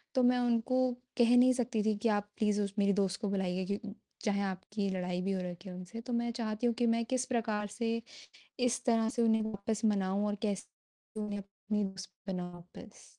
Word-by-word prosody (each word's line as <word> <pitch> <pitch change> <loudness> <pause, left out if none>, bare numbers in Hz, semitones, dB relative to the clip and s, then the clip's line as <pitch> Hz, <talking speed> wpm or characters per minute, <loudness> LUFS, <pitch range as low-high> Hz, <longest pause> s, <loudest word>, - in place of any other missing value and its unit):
तो 255 - +4
मैं 250 0 +5
उनको 240 +1 +2 0.4
कह 240 0 +6
नहीं 255 +1 +7
सकती 240 -3 0
थी 215 -1 +3
कि 225 +2 +1
आप 205 0 -10
प्लीज़ 210 -1 +2 0.2
मेरी 200 0 +4
दोस्त 195 +4 -2
को 205 - 0
बुलाइए 185 -1 0
क्यों 205 +2 -3 0.3
चाहे 200 -2 +1
आपकी 195 +1 -2
लड़ाई 180 -1 -1
भी 195 +1 0
हो 190 -1 0
रखी 180 +1 -6
हो 180 - -7
उनसे, 185 +5 -7
तो 245 0 -5
मैं 235 0 +1
चाहती 225 0 -1
हूँ 235 - +2
कि 240 - +3
मैं 230 0 +1
किस 255 +1 0
प्रकार 220 -4 0
से 230 +2 -1 0.6
इस 245 0 +1
तरह 225 -2 +3
से 240 -1 -1
उन्हें 220 -1 +4
वापस 215 +1 -2
मनाऊँ 200 -1 +2
और 205 - 0
कैसे 210 +1 -5
उन्हें 205 -1 -3
अपनी 205 +1 -3
दोस्त 190 -1 -5 0.2
बनाऊँ 180 -2 -3
वापस। 175 0 -13
210 Hz, 205 wpm, -33 LUFS, 195-230 Hz, 0.6 s, नहीं